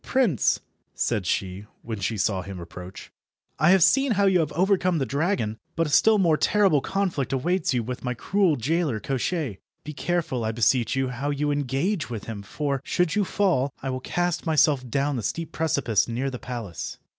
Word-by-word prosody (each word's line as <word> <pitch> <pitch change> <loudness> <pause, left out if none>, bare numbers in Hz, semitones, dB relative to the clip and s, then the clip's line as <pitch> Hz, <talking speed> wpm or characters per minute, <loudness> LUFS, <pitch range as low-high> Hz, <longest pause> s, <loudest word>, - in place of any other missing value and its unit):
"Prince," 235 - +2 0.4
said 105 -7 -1
she, 95 +3 -2 0.2
when 110 -3 -5
she 105 +3 -2
saw 95 -1 0
him 95 0 -8
approach, 90 +2 -10 0.5
"I 155 - +4
have 190 -2 +6
seen 270 +3 +4
how 200 0 +2
you 190 -2 +4
have 155 -3 0
overcome 185 +1 +2
the 135 - 0
dragon, 140 - -1 0.2
but 165 - +1
a 150 - -4
still 215 +9 +5
more 170 -6 +3
terrible 195 -8 +3
conflict 190 -8 -1
awaits 175 +8 0
you 120 - 0
with 125 +2 -6
my 125 -1 -2
cruel 185 - +2
jailer, 145 -1 0
Koshchei. 135 - -2 0.2
Be 150 - -7
careful, 155 -6 -1
I 110 0 -1
beseech 120 +2 +2
you, 135 -1 0
how 135 +3 -3
you 145 +1 0
engage 145 - -1
with 115 -4 -5
him, 110 -3 -6
for, 140 +6 -3
should 175 +2 0
you 210 - +2
fall, 180 -9 +1
I 135 - -2
will 130 - -3
cast 175 +5 -1
myself 145 -5 +3
down 140 +2 0
the - - -2
steep 165 +10 -3
precipice 140 -9 +1
near 125 +4 -2
the 125 - -6
palace." 115 -9 -6
140 Hz, 190 wpm, -25 LUFS, 120-175 Hz, 0.5 s, have